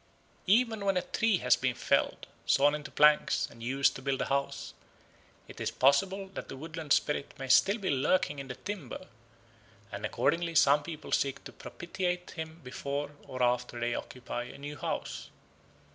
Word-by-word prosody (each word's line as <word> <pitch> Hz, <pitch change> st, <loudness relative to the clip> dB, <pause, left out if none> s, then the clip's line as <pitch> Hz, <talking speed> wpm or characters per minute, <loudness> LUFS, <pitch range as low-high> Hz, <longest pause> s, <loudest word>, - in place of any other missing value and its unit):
Even 220 Hz, +1 st, +3 dB
when 195 Hz, -2 st, +2 dB
a 180 Hz, -, 0 dB
tree 225 Hz, -4 st, +1 dB
has 125 Hz, -5 st, +4 dB
been 125 Hz, 0 st, -1 dB
felled, -, -, +1 dB, 0.2 s
sawn 145 Hz, +1 st, +5 dB
into 150 Hz, -1 st, -5 dB
planks, 150 Hz, 0 st, +4 dB
and 115 Hz, -, -15 dB
used 135 Hz, +3 st, +2 dB
to -, -, -7 dB
build 135 Hz, 0 st, -1 dB
a -, -, 0 dB
house, 140 Hz, 0 st, -2 dB, 0.7 s
it -, -, -10 dB
is -, -, 0 dB
possible 190 Hz, +9 st, +2 dB
that 195 Hz, -, -8 dB
the 135 Hz, -, -7 dB
woodland 155 Hz, 0 st, -7 dB
spirit 145 Hz, 0 st, +1 dB
may 135 Hz, -2 st, -5 dB
still 200 Hz, -, +5 dB
be 195 Hz, -6 st, -1 dB
lurking 145 Hz, +2 st, +1 dB
in 135 Hz, -, -6 dB
the 125 Hz, -, -6 dB
timber, 200 Hz, +7 st, -6 dB, 0.9 s
and -, -, -6 dB
accordingly 170 Hz, 0 st, 0 dB
some 145 Hz, 0 st, +6 dB
people 155 Hz, 0 st, -8 dB
seek 140 Hz, -1 st, 0 dB
to -, -, -9 dB
propitiate 180 Hz, 0 st, -4 dB
him 160 Hz, 0 st, -7 dB
before 140 Hz, +3 st, -4 dB, 0.2 s
or 130 Hz, -1 st, -2 dB
after 120 Hz, 0 st, 0 dB
they 120 Hz, 0 st, 0 dB
occupy 125 Hz, 0 st, -5 dB
the -, -, -12 dB
new 145 Hz, +1 st, -7 dB
house. -, -, -4 dB
145 Hz, 175 wpm, -30 LUFS, 135-175 Hz, 0.9 s, some